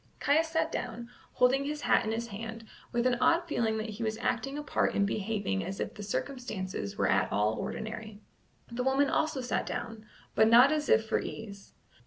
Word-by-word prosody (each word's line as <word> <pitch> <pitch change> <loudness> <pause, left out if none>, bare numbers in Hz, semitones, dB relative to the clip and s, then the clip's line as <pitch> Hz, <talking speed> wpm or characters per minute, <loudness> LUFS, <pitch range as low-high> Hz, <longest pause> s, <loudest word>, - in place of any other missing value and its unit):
Caius 310 +3 +3
sat 320 0 0
down, 240 0 -5 0.2
holding 260 +2 +3
his 295 +1 -3
hat - - +3
in 220 - -2
his 235 +1 -3
hand, 225 +2 -7 0.3
with 240 0 0
an 245 -1 +2
odd 335 +5 +3
feeling 225 -7 0
that 220 0 -3
he 210 +3 -8
was 220 0 -1
acting 260 +4 -1
a 295 - -4
part 285 - 0
in 200 - +3
behaving 200 - -1
as 195 - -5
if - - -3
the 210 - -9
circumstances 200 - -4
were - - +2
at - - +2
all 105 +1 +2
ordinary. 220 - -5 0.5
The 235 +1 -2
woman 270 +2 +2
also 310 -4 0
sat 250 - -1
down, 225 -2 -5 0.3
but 220 0 +5
not 245 +5 +8
as 305 -1 -1
if 220 - +5
for - - +1
ease. 200 -3 -8
230 Hz, 200 wpm, -30 LUFS, 215-270 Hz, 0.5 s, not